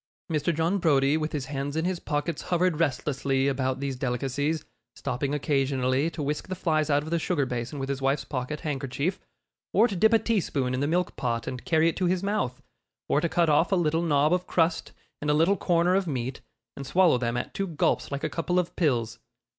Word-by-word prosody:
Mr. 155 +1 +1
John 165 +5 0
Browdie, 140 -4 +3
with 155 0 -1
his 145 -4 -3
hands 140 +1 -4
in 160 +1 0
his 180 -1 -1
pockets, 150 0 -2
hovered 180 -2 +1
restlessly 135 -2 0
about 130 -1 0
these 140 -1 -2
delicacies, 135 +5 -1 0.3
stopping 135 +1 -2
occasionally 135 -1 +1
to 155 -2 -5
whisk 150 +2 -2
the 185 - -3
flies 155 -4 0
out 145 0 +2
of 160 - -7
the 170 - +2
sugar 160 -4 0
basin 125 +3 -4
with 135 -1 -3
his 140 0 -3
wife's 135 +2 +1
pocket 135 +2 -4
handkerchief, 140 +5 -2 0.5
or 235 - +5
to 200 - -4
dip 220 +5 +4
a 225 - +6
teaspoon 175 - 0
in 130 - -1
the 145 - 0
milk 180 +3 0
pot 115 -2 -1
and 125 -1 -6
carry 165 -3 +3
it 165 - 0
to 180 - +1
his 180 +1 0
mouth, 200 -12 -1 0.4
or 145 - +2
to 170 - 0
cut 170 0 +2
off 155 +5 +3
a - - +4
little 165 -2 +1
knob 150 -1 +3
of 180 0 0
crust, 165 -1 +1 0.3
and 150 - -2
a 150 - +4
little 165 +6 +4
corner 175 -1 +2
of 190 -1 +1
meat, 130 -3 -3 0.3
and 140 -1 -7
swallow 175 -7 +4
them 120 0 -1
at 120 - -4
two 195 - -2
gulps 160 -3 0
like 140 0 -4
a - - +1
couple 170 +3 -1
of 180 -1 0
pills. 115 -8 0
150 Hz, 220 wpm, -27 LUFS, 135-170 Hz, 0.5 s, a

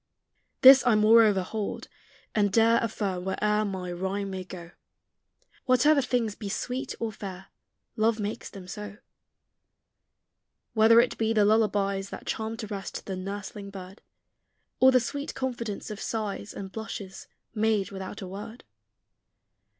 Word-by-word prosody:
This 265 0 +10
I 235 - +5
moreover 215 -2 +5
hold, 210 +2 -4 0.5
and 205 -2 +2
dare 230 +2 +4
Affirm 200 -5 -2
where'er 210 +3 0
my 185 -3 -4
rhyme 195 +3 -3
may 190 -1 -4
go, 175 -2 -10 0.9
Whatever 270 +4 +4
things 245 -4 0
be 205 -1 -7
sweet 250 +6 -3
or 225 -1 -2
fair, 190 -2 -8 0.5
Love 220 0 +2
makes 210 +1 -4
them 190 -2 -11
so. 210 +2 -7 1.8
Whether 225 +1 +7
it 245 - -2
be 225 0 +1
the 210 -2 +4
lullabies 200 -2 +1
That - - -8
charm 220 0 -3
to 225 - -5
rest 200 -2 -6
the 190 - -4
nursling 200 +1 -6
bird, 190 0 -10 0.8
Or 260 0 +7
the 255 - +5
sweet 280 +4 -4
confidence 235 -6 -4
of 210 - -7
sighs 210 -2 -3
And 195 -1 -7
blushes, 205 -3 -7 0.3
made 215 -3 +1
without 190 +1 -7
a - - -6
word. 210 +5 -8
210 Hz, 140 wpm, -27 LUFS, 195-225 Hz, 1.8 s, This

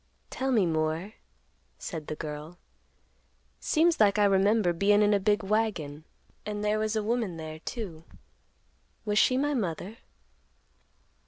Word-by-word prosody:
"Tell 265 0 -1
me 220 -7 +4
more," 160 +4 -1 0.6
said 160 -4 -6
the 155 - -4
girl. 150 +3 -7 1.0
"Seems 330 +1 +2
like 205 -2 +4
I 205 - +4
remember 195 -1 +3
bein' 205 +4 +4
in 210 0 +4
a 200 - +3
big 205 +2 +1
wagon, 195 -8 -1 0.4
and 210 0 -4
there 210 +1 +1
was 215 0 -1
a 215 - 0
woman 220 -6 -1
there 155 -1 -7
too; 170 -5 -6 1.0
was 210 0 +2
she 255 - +4
my 290 +2 +1
mother?" 200 - -3
205 Hz, 140 wpm, -28 LUFS, 165-215 Hz, 1.0 s, me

